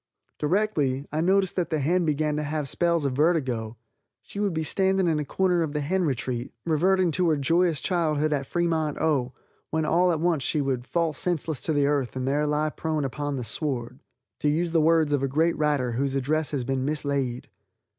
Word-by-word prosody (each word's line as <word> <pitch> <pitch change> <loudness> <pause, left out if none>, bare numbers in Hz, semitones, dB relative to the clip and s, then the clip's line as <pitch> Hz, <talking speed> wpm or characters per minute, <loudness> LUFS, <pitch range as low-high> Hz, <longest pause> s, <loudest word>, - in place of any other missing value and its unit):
Directly 150 -6 0
I 155 +1 -1
noticed 190 +2 +2
that 180 - 0
the 160 - 0
hen 170 +5 +1
began 150 0 0
to - - -1
have 150 -1 -2
spells 170 +1 +1
of 135 - 0
vertigo. 130 -7 0 0.5
She 200 - -8
would 205 -1 +1
be 160 -1 -2
standing 190 +3 +1
in 160 -2 +1
a 150 - -3
corner 180 +2 +1
of 155 -3 -2
the 150 - -1
hen 180 +5 0
retreat, 125 -3 -2
reverting 180 +3 +2
to 180 +1 +1
her 155 - +2
joyous 165 +2 +2
childhood 155 -3 0
at 140 -2 -2
Fremont, 165 -3 0
O., 135 -5 0 0.4
when 160 0 0
all 180 +3 +3
at 160 - -1
once 165 -3 +1
she 150 - -1
would 130 -3 -2
"fall 170 -2 0
senseless 160 -1 -2
to - - -1
the 145 -1 +2
earth 140 -4 0
and 130 0 -2
there 145 +2 +1
lie 150 +1 0
prone 155 -2 -2
upon 145 +2 -3
the 125 - -3
sward," 125 0 -3 0.4
to 150 - +1
use 165 +3 0
the 165 -1 +3
words 160 -2 +3
of 145 - +1
a 135 - +1
great 160 +5 +1
writer 145 -5 0
whose 135 +3 -1
address 150 +3 0
has 140 -4 -2
been 130 +1 -1
mislaid. 140 -4 -2
150 Hz, 205 wpm, -26 LUFS, 140-170 Hz, 0.5 s, all